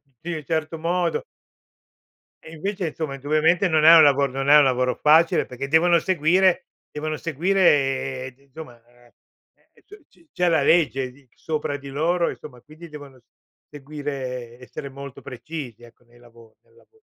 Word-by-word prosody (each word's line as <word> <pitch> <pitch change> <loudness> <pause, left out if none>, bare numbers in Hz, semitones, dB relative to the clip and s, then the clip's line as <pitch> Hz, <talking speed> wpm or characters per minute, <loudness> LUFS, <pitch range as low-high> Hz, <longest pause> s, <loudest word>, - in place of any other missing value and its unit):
tutti 140 +5 -11
in - - -2
un 155 -2 -7
certo 160 +2 -3
modo. 180 - -1 1.2
E, 160 - -12
invece, 190 +3 -4
insomma, 155 -2 -5
indubbiamente, 155 +7 +1
non 155 -2 +2
è 165 +1 +9
un 165 - +8
lavo 140 -1 +4
non 135 +1 -4
è 150 - +8
un 150 - +7
lavoro 125 -1 0
facile, 160 +2 +3
perché 130 +2 -7
devono 170 +3 +4
seguire 185 +2 +2 0.3
devono 155 +1 -4
seguire 135 -6 0
d - - -38
insomma 135 -3 -13
ehm, 120 0 -25 0.7
c 415 +1 -16
ci 335 - -27
c'è 180 0 0
la 160 -4 +2
legge 140 -5 +2
di 135 -1 -23
sopra 150 -2 -4
di 140 0 -11
loro, 165 +5 0
insomma, 125 -5 -12
quindi 155 +3 -14
devono 145 -3 -12
s 120 - -29 0.5
seguire 135 -4 -7
essere 130 +2 -9
molto 140 -1 -10
precisi, 125 -1 -9
ecco, 120 +1 -18
nei 120 0 -23
lavo 115 -2 -20
nel 450 - -31
lavo 450 -1 -26
145 Hz, 170 wpm, -22 LUFS, 130-165 Hz, 1.2 s, è